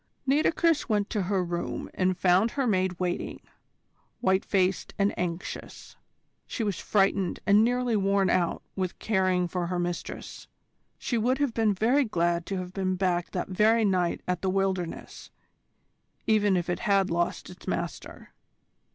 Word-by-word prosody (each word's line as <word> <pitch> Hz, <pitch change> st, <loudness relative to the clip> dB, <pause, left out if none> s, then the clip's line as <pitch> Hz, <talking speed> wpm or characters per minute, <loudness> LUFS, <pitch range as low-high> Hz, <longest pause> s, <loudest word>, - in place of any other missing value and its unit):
Nitocris 310 Hz, +2 st, +2 dB
went 205 Hz, -2 st, 0 dB
to 210 Hz, -, 0 dB
her 190 Hz, 0 st, 0 dB
room 175 Hz, 0 st, -3 dB
and 185 Hz, -1 st, +1 dB
found 185 Hz, +5 st, +3 dB
her 270 Hz, +2 st, -1 dB
maid 185 Hz, -5 st, +1 dB
waiting, 180 Hz, -1 st, -2 dB, 0.8 s
white 190 Hz, 0 st, +2 dB
faced 190 Hz, -1 st, 0 dB
and 200 Hz, 0 st, +2 dB
anxious. 175 Hz, +1 st, -5 dB, 0.5 s
She 230 Hz, -, -3 dB
was 200 Hz, -5 st, -2 dB
frightened 195 Hz, -2 st, +1 dB
and 205 Hz, +2 st, +5 dB
nearly 245 Hz, 0 st, +1 dB
worn 195 Hz, -1 st, +2 dB
out 175 Hz, -1 st, +1 dB
with 185 Hz, -2 st, -3 dB
caring 185 Hz, -4 st, +1 dB
for 175 Hz, 0 st, -2 dB
her 180 Hz, 0 st, -2 dB
mistress. 175 Hz, 0 st, -5 dB, 0.5 s
She 235 Hz, -, -1 dB
would 250 Hz, +4 st, +1 dB
have 285 Hz, -4 st, 0 dB
been 220 Hz, -3 st, +2 dB
very 245 Hz, +9 st, +3 dB
glad 170 Hz, -6 st, 0 dB
to 195 Hz, -, -2 dB
have 180 Hz, 0 st, -6 dB
been 185 Hz, -1 st, -1 dB
back 180 Hz, -2 st, 0 dB
that 180 Hz, -, -3 dB
very 220 Hz, +4 st, +3 dB
night 180 Hz, -3 st, +1 dB
at 180 Hz, -1 st, -1 dB
"The 190 Hz, -, 0 dB
Wilderness," 190 Hz, -2 st, -2 dB, 1.0 s
even 210 Hz, -3 st, +3 dB
if 175 Hz, -, -2 dB
it 175 Hz, -, -1 dB
had 200 Hz, -5 st, +2 dB
lost 175 Hz, +1 st, -1 dB
its 180 Hz, -, -15 dB
master. -, -, -5 dB
190 Hz, 155 wpm, -27 LUFS, 180-215 Hz, 1.0 s, and